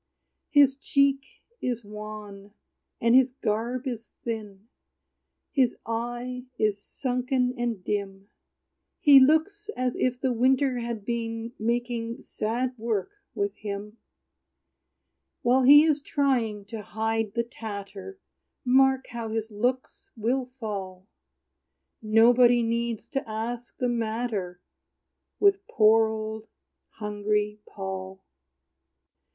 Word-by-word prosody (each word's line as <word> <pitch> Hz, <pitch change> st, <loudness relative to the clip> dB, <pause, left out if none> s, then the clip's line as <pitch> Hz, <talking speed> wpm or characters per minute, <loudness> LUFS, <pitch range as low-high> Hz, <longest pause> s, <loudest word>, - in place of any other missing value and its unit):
His 280 Hz, -2 st, +5 dB
cheek 275 Hz, -1 st, +2 dB, 0.3 s
is 240 Hz, -3 st, -2 dB
wan, 210 Hz, -1 st, -9 dB, 0.4 s
and 230 Hz, 0 st, +3 dB
his 260 Hz, 0 st, +5 dB
garb 240 Hz, +2 st, -2 dB
is 235 Hz, -3 st, -5 dB
thin; 215 Hz, -3 st, -5 dB, 0.8 s
His 260 Hz, -5 st, +2 dB
eye 240 Hz, +2 st, -4 dB
is 210 Hz, -2 st, +1 dB
sunken 250 Hz, +1 st, -1 dB
and 235 Hz, -6 st, -2 dB
dim; 200 Hz, -1 st, -4 dB, 0.7 s
He 285 Hz, -2 st, +8 dB
looks 320 Hz, +10 st, +3 dB
as 255 Hz, -1 st, 0 dB
if 250 Hz, -1 st, 0 dB
the 260 Hz, -2 st, 0 dB
winter 255 Hz, +2 st, +2 dB
had 235 Hz, -3 st, -4 dB
been 230 Hz, 0 st, -3 dB
Making 235 Hz, 0 st, -2 dB
sad 245 Hz, +4 st, -2 dB
work 220 Hz, -, -1 dB, 0.2 s
with 405 Hz, -1 st, -1 dB
him. 210 Hz, +1 st, -6 dB, 1.5 s
While 255 Hz, +2 st, +4 dB
he 290 Hz, +3 st, +9 dB
is 305 Hz, -2 st, +2 dB
trying 245 Hz, -9 st, 0 dB
to 215 Hz, +1 st, -7 dB
hide 220 Hz, 0 st, -2 dB
the 235 Hz, -, +1 dB
tatter, 215 Hz, -, -8 dB, 0.5 s
Mark 265 Hz, +1 st, +4 dB
how 235 Hz, -2 st, -4 dB
his 220 Hz, 0 st, -3 dB
looks 245 Hz, +5 st, -2 dB
will 245 Hz, +4 st, 0 dB
fall! 190 Hz, -4 st, -5 dB, 1.0 s
Nobody 235 Hz, +2 st, +5 dB
needs 230 Hz, -1 st, -2 dB
to 270 Hz, -4 st, -3 dB
ask 230 Hz, +2 st, -5 dB
the 250 Hz, -, 0 dB
matter 220 Hz, -6 st, -2 dB, 0.8 s
With 400 Hz, 0 st, +3 dB
poor, 220 Hz, -1 st, +5 dB
old, 220 Hz, 0 st, -5 dB, 0.5 s
hungry 210 Hz, 0 st, -1 dB
Paul. 190 Hz, -1 st, -6 dB
230 Hz, 110 wpm, -27 LUFS, 215-255 Hz, 1.5 s, he